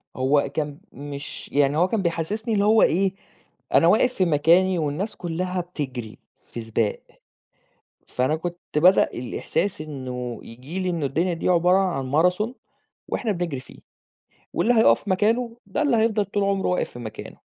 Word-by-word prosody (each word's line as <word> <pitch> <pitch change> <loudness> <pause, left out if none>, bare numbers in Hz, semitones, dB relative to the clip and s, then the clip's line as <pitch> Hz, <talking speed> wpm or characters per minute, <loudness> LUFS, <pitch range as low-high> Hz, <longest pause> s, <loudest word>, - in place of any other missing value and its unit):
هو 140 +2 +2
كان 150 0 -3
مش 140 0 -8
يعني 145 +1 +3
هو 180 +3 +4
كان 215 0 -1
بيحسّسني 195 +7 -2
اللي 200 0 +2
هو 220 +1 +5
إيه، 190 +3 +3 0.6
أنا - - +5
واقف 250 - +4
في 190 - +1
مكاني 170 +3 +3
والناس 155 +8 -2
كلّها 180 +1 -3
بتجري 130 -10 -6 0.3
في 120 - -7
سباق، 110 -1 -1 1.1
فأنا 130 +5 0
كنت 175 +2 -5 0.2
بدأ 180 +5 +6
الإحساس 170 +9 -2
إنه 125 -5 -5
ييجي 130 +11 -8
لي 185 - -1
إنه 165 -4 -1
الدنيا 165 +6 0
دي 165 - -2
عبارة 180 +1 +4
عن 165 -9 -1
Marathon 180 - +2 0.5
وإحنا 225 -4 -1
بنجري 170 -7 -3
فيه - - -15 0.7
واللي 245 - +2
هيقف 220 -2 +4
مكانه 230 +5 +1
ده 205 +9 -2
اللي 280 -6 +3
هيفضَل 220 -2 +2
طول 200 +1 -1
عُمره 195 -1 0
واقف 180 - 0
في 120 - -10
مكانه، 110 -3 -8
175 Hz, 160 wpm, -24 LUFS, 145-195 Hz, 1.1 s, بدأ